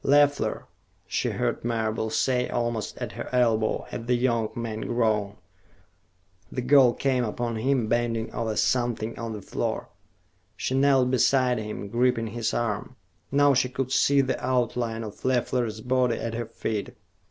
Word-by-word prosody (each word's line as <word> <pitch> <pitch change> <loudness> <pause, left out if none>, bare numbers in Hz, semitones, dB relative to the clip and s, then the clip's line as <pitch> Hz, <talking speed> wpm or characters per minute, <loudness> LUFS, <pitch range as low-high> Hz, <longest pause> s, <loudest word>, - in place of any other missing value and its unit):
"Leffler!" 145 0 +3 0.4
she - - -1
heard - - -2
Marable 110 -1 -1
say, 125 +2 +1
almost 120 -2 -2
at - - -4
her - - -6
elbow, 115 -3 +2
and 115 - -6
the 125 - +3
young 120 -3 +1
man 115 -2 -4
groaned. 110 -4 0 1.2
The 125 - -3
girl 130 -2 +6
came 130 -1 +1
upon 115 +1 -2
him, 125 0 +1
bending 115 -1 -1
over 110 -2 -2
something 120 -1 0
on 115 -1 -4
the 105 -2 -7
floor. - - -3 0.7
She - - -2
knelt 135 -2 +4
beside 130 -1 +3
him, 105 -1 -5
gripping 120 +1 +1
his 120 -2 -1
arm. 115 +1 -2 0.4
Now 145 0 +5
she 125 -1 +2
could 130 0 -3
see 140 0 +4
the 130 -1 -2
outline 120 -2 0
of 105 -2 -9
Leffler's 120 -3 0
body 125 0 +1
at 115 - -4
her 115 -1 -3
feet. 110 -2 -4
120 Hz, 155 wpm, -26 LUFS, 110-130 Hz, 1.2 s, girl